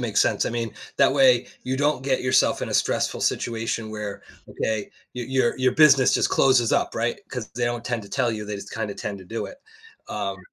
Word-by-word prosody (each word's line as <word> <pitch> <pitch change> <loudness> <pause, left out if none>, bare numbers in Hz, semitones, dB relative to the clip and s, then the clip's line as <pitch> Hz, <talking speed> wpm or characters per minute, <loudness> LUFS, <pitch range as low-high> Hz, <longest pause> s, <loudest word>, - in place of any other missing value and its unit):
makes 110 -4 +1
sense - - +2
I - - -2
mean, 115 -2 -3 0.2
that - - +4
way, 130 -3 +4 0.2
you 130 +1 -2
don't 145 -2 +1
get 135 -1 0
yourself 130 +1 +3
in - - -3
a - - -4
stressful - - 0
situation 115 -1 -2
where 105 -2 -6 0.3
okay, 110 -2 -3 0.2
your 120 -2 -5
your 130 -2 +1
your 130 0 +2
business 140 -4 +6
just - - +2
closes 130 -4 +3
up - - +1
right? 120 +1 -1
'Cause 125 -4 -5
they 120 - -1
don't 120 0 -3
tend 120 -2 -2
to 100 - -12
tell 125 -1 0
you 105 -1 -5
they 105 0 -4
just 100 0 -9
kinda 105 -1 -3
tend 100 - -5
to 95 - -12
do 115 +5 -4
it, 275 - -12 0.5
um 100 -2 -3
120 Hz, 220 wpm, -24 LUFS, 110-130 Hz, 0.5 s, business